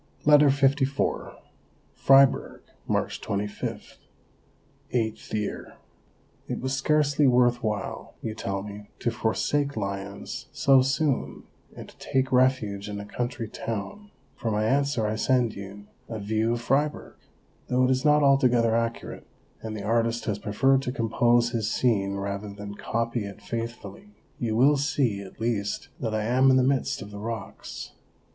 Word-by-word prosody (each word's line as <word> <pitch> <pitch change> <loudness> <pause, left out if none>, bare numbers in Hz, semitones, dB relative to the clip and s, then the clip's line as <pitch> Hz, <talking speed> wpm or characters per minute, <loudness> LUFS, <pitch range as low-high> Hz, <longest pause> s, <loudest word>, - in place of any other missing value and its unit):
LETTER 150 0 +7
LIV 135 0 +1 0.6
Fribourg, 135 0 +4 0.3
March - - -1
25 100 +1 -4 0.9
(VIII). 110 -3 -2 1.0
It - - -3
was 130 +1 -2
scarcely 145 +1 +2
worth 120 -1 +4
while, 105 -3 -4
you 110 - -4
tell 100 -3 -3
me, 105 0 -9
to 120 - -1
forsake 140 +5 0
Lyons 100 -1 -5
so 135 -1 +5
soon 135 +1 -1 0.3
and - - -8
to - - -16
take 130 0 0
refuge 125 -6 +2
in 105 0 -5
a 100 - -7
country 120 +1 -4
town; 115 - -6 0.3
for 115 - -3
my 105 0 0
answer 140 -1 +1
I 105 +1 -1
send 120 -1 +2
you 100 +1 -9 0.2
a 115 - -4
view 110 +2 0
of 120 - -3
Fribourg. 145 +5 -1 0.5
Though 125 0 +2
it 130 - +3
is 130 0 +1
not 150 0 +4
altogether 125 -5 +4
accurate, 115 0 -3 0.3
and 110 -1 -5
the 100 - -6
artist 115 +1 0
has 105 -2 -2
preferred 135 +7 +2
to 125 - -3
compose 120 -1 +2
his 110 -3 -1
scene 100 -6 +1
rather 100 +1 -4
than 100 0 -8
copy 115 +1 -2
it 100 0 -9
faithfully, 115 - -7 0.2
you 110 -2 -1
will 140 +5 +5
see 135 -8 0
at 95 +2 -12
least 110 -3 -2
that 110 -4 -2
I 110 - 0
am 130 +4 +4
in 130 - +5
the 130 - +4
midst 135 +1 0
of 105 - -11
the 100 - -8
rocks. 110 -1 -6
115 Hz, 150 wpm, -26 LUFS, 105-135 Hz, 1.0 s, LETTER